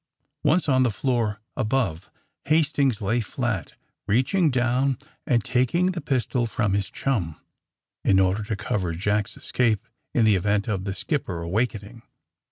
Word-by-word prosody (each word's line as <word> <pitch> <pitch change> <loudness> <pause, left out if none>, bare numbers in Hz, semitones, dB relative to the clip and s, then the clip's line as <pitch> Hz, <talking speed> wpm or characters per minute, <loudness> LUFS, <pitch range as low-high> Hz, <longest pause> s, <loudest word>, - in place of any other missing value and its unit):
.Once 170 +1 +3
on 130 -2 +4
the 130 - +4
floor 110 0 -1 0.2
above 110 -8 -1 0.4
Hastings 140 -7 +2
lay 110 +5 +1
flat, 110 - -3 0.3
reaching 130 - +3
down 125 +1 +1 0.3
and 120 -7 +2
taking 170 +9 +2
the 175 -2 -4
pistol 125 -3 0
from 105 -3 0
his 100 -1 0
chum, 95 - -2 0.6
in 95 - +4
order 95 +2 +2
to 110 0 -2
cover 100 -4 -2
Jack^s 105 +5 -1
escape 115 -2 0 0.3
in 120 -4 +4
the 110 -2 +5
event 100 +2 +1
of 100 -4 -2
the 95 -1 -3
skipper 100 - -2
awakening. 105 +4 -2
115 Hz, 145 wpm, -25 LUFS, 100-130 Hz, 0.6 s, the